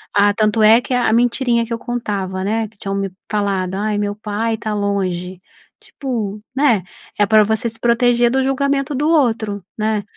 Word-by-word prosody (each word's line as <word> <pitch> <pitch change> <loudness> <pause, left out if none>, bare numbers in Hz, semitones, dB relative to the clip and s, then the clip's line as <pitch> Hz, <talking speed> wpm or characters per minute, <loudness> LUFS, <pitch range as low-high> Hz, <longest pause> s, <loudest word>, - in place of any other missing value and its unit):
Ah, 205 0 +4
tanto 215 +1 +1
é 225 +3 +7
que - - -10
a 245 -3 +2
mentirinha 240 0 +2
que 235 - -4
eu - - -1
contava 200 -6 -3
né. 220 +2 -1
Que 215 - -24
tinham 195 0 -3
me 195 -1 -2 0.2
falado 195 -3 -1
"Ai 210 +1 -1
meu 205 0 -2
pai 220 +2 -2
tá 215 0 -4
longe". 190 -3 -2 0.4
Tipo, 225 -7 -4 0.2
né, 245 -10 +3 0.3
é 205 - +4
pra 215 +1 +5
você 220 +2 0
se 225 - -8
proteger 240 0 +3
do 265 - +2
julgamento 275 +1 0
do 295 +3 0
outro, 230 -9 +2 0.2
né, 215 -1 0
220 Hz, 185 wpm, -18 LUFS, 205-240 Hz, 0.4 s, é